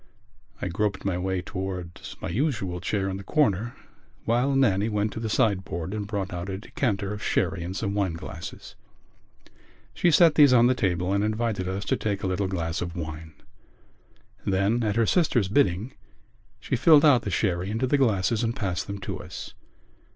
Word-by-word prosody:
I -, -, -3 dB
groped 100 Hz, +1 st, -2 dB
my 90 Hz, -2 st, 0 dB
way 95 Hz, 0 st, -2 dB
towards 95 Hz, -2 st, -6 dB
my -, -, -5 dB
usual 110 Hz, -, -1 dB
chair 95 Hz, +1 st, -1 dB
in 95 Hz, 0 st, -3 dB
the 100 Hz, -, -8 dB
corner 120 Hz, -3 st, +1 dB, 0.5 s
while 125 Hz, +4 st, +2 dB
Nannie 110 Hz, -5 st, +3 dB
went 105 Hz, 0 st, -1 dB
to -, -, -5 dB
the 110 Hz, -1 st, -3 dB
sideboard 95 Hz, -6 st, 0 dB
and 105 Hz, -2 st, -3 dB
brought 100 Hz, -3 st, -3 dB
out 90 Hz, +2 st, -4 dB
a 95 Hz, -, -3 dB
decanter 100 Hz, -2 st, -2 dB
of 105 Hz, -, -7 dB
sherry 85 Hz, -, 0 dB
and 90 Hz, +2 st, -5 dB
some 100 Hz, -2 st, -2 dB
wine 100 Hz, -4 st, 0 dB
glasses. 80 Hz, 0 st, -8 dB, 1.2 s
She 175 Hz, -, +2 dB
set 165 Hz, -1 st, +6 dB
these 145 Hz, -4 st, +6 dB
on 120 Hz, -1 st, +6 dB
the 125 Hz, -, +4 dB
table 90 Hz, -5 st, 0 dB
and 100 Hz, 0 st, +1 dB
invited 110 Hz, -3 st, -1 dB
us 95 Hz, +2 st, -3 dB
to -, -, +1 dB
take 100 Hz, -2 st, -2 dB
a -, -, 0 dB
little 95 Hz, +1 st, 0 dB
glass 85 Hz, -3 st, -2 dB
of 85 Hz, -1 st, -4 dB
wine. 80 Hz, -1 st, -6 dB, 1.1 s
Then, 100 Hz, +5 st, +1 dB
at 105 Hz, -2 st, 0 dB
her 115 Hz, 0 st, +3 dB
sister's 120 Hz, -, +2 dB
bidding, 105 Hz, +1 st, +1 dB, 0.7 s
she -, -, -2 dB
filled 155 Hz, -2 st, +6 dB
out 135 Hz, -5 st, +6 dB
the -, -, -4 dB
sherry 95 Hz, -2 st, 0 dB
into 110 Hz, +4 st, 0 dB
the 140 Hz, +2 st, +2 dB
glasses 110 Hz, -3 st, +2 dB
and 115 Hz, +1 st, -1 dB
passed 95 Hz, -4 st, -2 dB
them 100 Hz, 0 st, -4 dB
to 100 Hz, -, -5 dB
us. -, -, -8 dB
100 Hz, 185 wpm, -26 LUFS, 95-115 Hz, 1.2 s, set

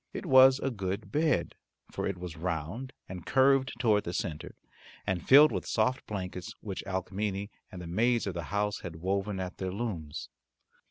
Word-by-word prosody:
It -, -, -5 dB
was 130 Hz, 0 st, +7 dB
a 135 Hz, 0 st, -2 dB
good 100 Hz, -1 st, -4 dB
bed, 150 Hz, -, +1 dB, 0.4 s
for -, -, -2 dB
it 95 Hz, -, -3 dB
was 90 Hz, -2 st, -7 dB
round 85 Hz, -, -4 dB, 0.2 s
and 90 Hz, -2 st, -7 dB
curved 135 Hz, -, +3 dB
toward 110 Hz, -4 st, +3 dB
the 85 Hz, -, -4 dB
centre, 80 Hz, -5 st, -4 dB, 0.5 s
and 95 Hz, -2 st, -1 dB
filled 145 Hz, +3 st, +9 dB
with -, -, -3 dB
soft 120 Hz, +4 st, 0 dB
blankets 90 Hz, -3 st, -5 dB
which 100 Hz, -3 st, -5 dB
Alcmene 100 Hz, +1 st, -2 dB, 0.2 s
and 90 Hz, -, -8 dB
the 90 Hz, -, -7 dB
maids 115 Hz, +7 st, +1 dB
of 100 Hz, -, -2 dB
the 85 Hz, -2 st, -4 dB
house 105 Hz, +2 st, -1 dB
had 85 Hz, -3 st, -7 dB
woven 95 Hz, +3 st, -2 dB
at 90 Hz, -1 st, -5 dB
their 95 Hz, -1 st, -2 dB
looms. 95 Hz, -8 st, -4 dB
100 Hz, 175 wpm, -30 LUFS, 90-120 Hz, 0.5 s, filled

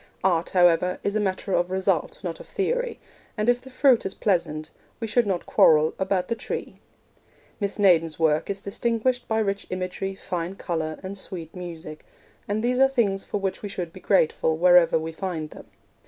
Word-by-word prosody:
Art, 175 Hz, -3 st, +2 dB
however, 180 Hz, 0 st, +3 dB
is 200 Hz, -, 0 dB
a -, -, +2 dB
matter 195 Hz, -1 st, -2 dB
of 175 Hz, +1 st, +1 dB
result, 190 Hz, -, -1 dB
not -, -, -4 dB
of -, -, -11 dB
theory, -, -, -1 dB, 0.4 s
and 210 Hz, +1 st, -1 dB
if 245 Hz, 0 st, +3 dB
the 265 Hz, -, -12 dB
fruit 255 Hz, -2 st, +4 dB
is 190 Hz, -, -4 dB
pleasant, 160 Hz, -6 st, -1 dB, 0.3 s
we 230 Hz, -, -3 dB
should 225 Hz, +1 st, +2 dB
not 185 Hz, -3 st, -1 dB
quarrel 155 Hz, 0 st, +5 dB
about 190 Hz, -1 st, 0 dB
the 230 Hz, -, 0 dB
tree. 230 Hz, -, -5 dB, 0.8 s
Miss 200 Hz, -1 st, -2 dB
Naden's 165 Hz, -6 st, +3 dB
work 155 Hz, 0 st, +1 dB
is 200 Hz, 0 st, -3 dB
distinguished 235 Hz, +4 st, -1 dB
by 220 Hz, -, 0 dB
rich 200 Hz, -2 st, -1 dB
imagery, 185 Hz, +1 st, -3 dB
fine 180 Hz, -1 st, -4 dB
colour, 160 Hz, -4 st, -3 dB
and 195 Hz, +1 st, -5 dB
sweet 170 Hz, -3 st, -5 dB
music, 165 Hz, -4 st, -8 dB, 0.4 s
and 210 Hz, +2 st, -1 dB
these 250 Hz, +1 st, +1 dB
are 270 Hz, 0 st, +6 dB
things 205 Hz, -7 st, 0 dB
for -, -, -3 dB
which 195 Hz, -2 st, -3 dB
we 205 Hz, -, -5 dB
should 180 Hz, -4 st, -5 dB
be 185 Hz, -, -10 dB
grateful, 160 Hz, -4 st, +2 dB
wherever 175 Hz, -1 st, +5 dB
we 160 Hz, 0 st, -4 dB
find 160 Hz, -3 st, -4 dB
them. -, -, -12 dB
190 Hz, 185 wpm, -25 LUFS, 170-210 Hz, 0.8 s, are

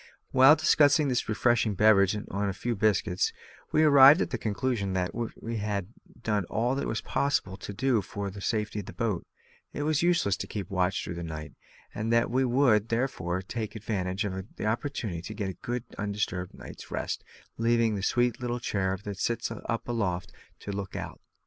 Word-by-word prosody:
While 135 Hz, +3 st, +8 dB
discussing 150 Hz, -1 st, +4 dB
this 125 Hz, -3 st, -1 dB
refreshing 110 Hz, -1 st, +2 dB
beverage 100 Hz, -1 st, +5 dB
and 105 Hz, -, -5 dB
a 100 Hz, 0 st, -1 dB
few 120 Hz, +5 st, -2 dB
biscuits, 100 Hz, -3 st, +1 dB, 0.4 s
we 155 Hz, -, +4 dB
arrived 140 Hz, +1 st, +8 dB
at -, -, -1 dB
the 125 Hz, -, -2 dB
conclusion 105 Hz, -2 st, -1 dB
that 90 Hz, -1 st, 0 dB
as 115 Hz, -1 st, -2 dB
we 115 Hz, 0 st, -4 dB
had 100 Hz, -3 st, -2 dB, 0.3 s
done 105 Hz, -2 st, +1 dB
all 120 Hz, +8 st, 0 dB
it -, -, -2 dB
was 110 Hz, -, -2 dB
possible 140 Hz, -9 st, 0 dB
to 100 Hz, -, -7 dB
do 115 Hz, +2 st, +1 dB
for 100 Hz, 0 st, -5 dB
the 100 Hz, +1 st, -9 dB
safety 105 Hz, -1 st, -1 dB
of 100 Hz, -, -7 dB
the -, -, -8 dB
boat, 110 Hz, -7 st, -2 dB, 0.5 s
it 145 Hz, -, -3 dB
was 155 Hz, -1 st, +1 dB
useless 170 Hz, -, +2 dB
to -, -, -5 dB
keep 100 Hz, -3 st, -5 dB
a -, -, -6 dB
watch 90 Hz, 0 st, +1 dB
through 85 Hz, -, -5 dB
the 85 Hz, 0 st, -5 dB
night, 80 Hz, -2 st, -6 dB, 0.4 s
and 110 Hz, +2 st, -2 dB
that 115 Hz, 0 st, +3 dB
we 130 Hz, +2 st, +2 dB
would, 120 Hz, -4 st, +3 dB
therefore, 105 Hz, -7 st, -1 dB
take 110 Hz, +3 st, -5 dB
advantage 100 Hz, -2 st, -2 dB
of 95 Hz, 0 st, -5 dB
the -, -, -5 dB
opportunity 110 Hz, -, -2 dB
to 100 Hz, +6 st, -7 dB
get 100 Hz, -2 st, -2 dB
a -, -, -16 dB
good 120 Hz, 0 st, -3 dB, 0.2 s
undisturbed 100 Hz, -3 st, -2 dB
night's -, -, -11 dB
rest, -, -, -3 dB, 0.4 s
leaving 115 Hz, -1 st, +3 dB
the 100 Hz, -, -2 dB
"sweet 120 Hz, +3 st, +1 dB
little 120 Hz, 0 st, -2 dB
cherub 95 Hz, -4 st, -1 dB
that 100 Hz, -2 st, -6 dB
sits 115 Hz, 0 st, -1 dB
up 115 Hz, 0 st, -4 dB
aloft" 100 Hz, -5 st, -2 dB, 0.2 s
to 100 Hz, -, -7 dB
look 100 Hz, -1 st, -5 dB
out. -, -, -6 dB
110 Hz, 195 wpm, -28 LUFS, 95-120 Hz, 0.5 s, While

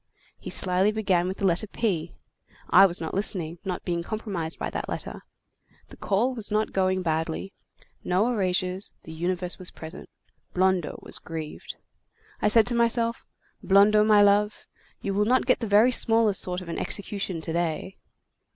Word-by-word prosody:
He -, -, -8 dB
slyly 185 Hz, +2 st, +4 dB
began 190 Hz, -5 st, 0 dB
with 190 Hz, -, -4 dB
the 200 Hz, -, -2 dB
letter 185 Hz, +4 st, +1 dB
P. 185 Hz, -7 st, -2 dB, 0.6 s
I 195 Hz, -, +8 dB
was 175 Hz, -1 st, -1 dB
not 160 Hz, -, -5 dB
listening, 175 Hz, -4 st, -2 dB
not 185 Hz, -2 st, -5 dB
being 170 Hz, -2 st, -1 dB
compromised 185 Hz, -5 st, -4 dB
by -, -, -4 dB
that -, -, -5 dB
letter. -, -, -5 dB, 0.7 s
The -, -, -14 dB
call 225 Hz, +6 st, 0 dB
was 225 Hz, -4 st, -2 dB
not 215 Hz, +1 st, 0 dB
going 185 Hz, -1 st, 0 dB
badly. 160 Hz, +3 st, -2 dB, 0.5 s
No 185 Hz, +5 st, +1 dB
erasures; 185 Hz, -2 st, -2 dB
the 160 Hz, -, -10 dB
universe 180 Hz, +2 st, -2 dB
was 185 Hz, -, -6 dB
present. 160 Hz, +2 st, -10 dB, 0.5 s
Blondeau 185 Hz, -3 st, +1 dB
was -, -, -5 dB
grieved. 160 Hz, -2 st, -7 dB, 0.7 s
I -, -, +2 dB
said 220 Hz, +1 st, +5 dB
to 245 Hz, -, -1 dB
myself: 235 Hz, 0 st, +1 dB, 0.4 s
'Blondeau, 205 Hz, +2 st, +5 dB
my 210 Hz, -1 st, +5 dB
love, 205 Hz, +1 st, +2 dB, 0.4 s
you 200 Hz, -, -2 dB
will 205 Hz, +1 st, +2 dB
not 255 Hz, +4 st, +2 dB
get 255 Hz, -, +2 dB
the 230 Hz, -, -3 dB
very 210 Hz, +5 st, +5 dB
smallest 225 Hz, -4 st, +4 dB
sort 180 Hz, 0 st, -3 dB
of 180 Hz, -, -10 dB
an 165 Hz, -, -4 dB
execution 200 Hz, -3 st, -3 dB
to 160 Hz, 0 st, -5 dB
day. 170 Hz, +2 st, -3 dB
190 Hz, 170 wpm, -25 LUFS, 175-210 Hz, 0.7 s, I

